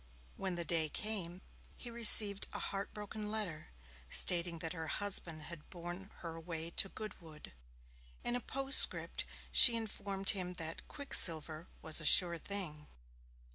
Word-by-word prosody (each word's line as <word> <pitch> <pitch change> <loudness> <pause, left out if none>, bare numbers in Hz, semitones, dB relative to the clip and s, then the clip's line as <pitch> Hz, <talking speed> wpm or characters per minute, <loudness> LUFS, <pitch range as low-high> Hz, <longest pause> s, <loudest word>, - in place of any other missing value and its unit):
When 190 -2 -5
the 170 -1 -5
day 160 -2 -1
came, 190 -2 -3 0.4
he 240 - -9
received 210 -3 +4
a - - -5
heart 200 +1 -5
broken 210 0 -8
letter, 205 -8 -5 0.4
stating 175 -1 +3
that 165 0 -5
her 160 -2 -7
husband 170 -5 -1
had 165 -1 -9
borne 175 +2 -9
her 165 -2 -7
away 165 0 -7
to 195 - +1
Goodwood. 165 - -10 0.7
In 240 - -2
a - - -2
postscript 270 +2 +1 0.3
she 235 - +9
informed 200 -3 -1
him 180 -2 -4
that 165 -2 -7
'Quicksilver 165 - +2 0.2
was 160 +1 +4
a - - -6
sure 170 -2 +5
thing'. 160 -6 -4
180 Hz, 140 wpm, -34 LUFS, 165-205 Hz, 0.7 s, she